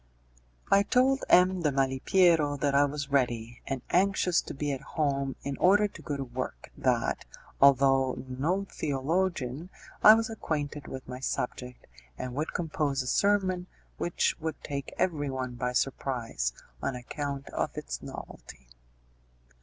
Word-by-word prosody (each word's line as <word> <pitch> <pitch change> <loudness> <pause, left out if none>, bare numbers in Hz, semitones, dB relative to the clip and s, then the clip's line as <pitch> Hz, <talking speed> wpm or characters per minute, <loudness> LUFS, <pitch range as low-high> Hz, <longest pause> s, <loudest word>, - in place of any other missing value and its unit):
I 195 - +7
told 260 +6 +2
M. 185 0 +5
de 150 -3 +2
Malipiero 145 +3 +3
that 140 0 +1
I 140 +1 +5
was 140 0 -4
ready, 120 -3 0
and 135 -2 -3
anxious 185 -1 +3
to - - -8
be 145 +1 -2
at 135 - -3 0.2
home 140 -3 0
in 140 -1 -3
order 205 +3 +5
to - - -13
go 145 - -3
to 135 - -3
work; 120 - -6
that, - - 0 0.4
although 135 -1 +4
no 160 +10 -1
theologian, 155 0 -1 0.3
I 215 - +10
was 225 +1 0
acquainted 150 -8 -3
with 130 0 -7
my 125 0 -6
subject, 125 -1 -4 0.3
and 125 - -5
would 150 +5 -2
compose 150 -5 -1
a - - -8
sermon 185 +1 +2 0.3
which 175 - +1
would 160 0 -4
take 140 -2 -4
everyone 135 -7 -1
by 125 +1 -2
surprise 120 - -1 0.3
on 135 - -2
account 140 +2 -5
of - - -3
its - - -5
novelty. - - -10
140 Hz, 145 wpm, -29 LUFS, 130-175 Hz, 0.4 s, I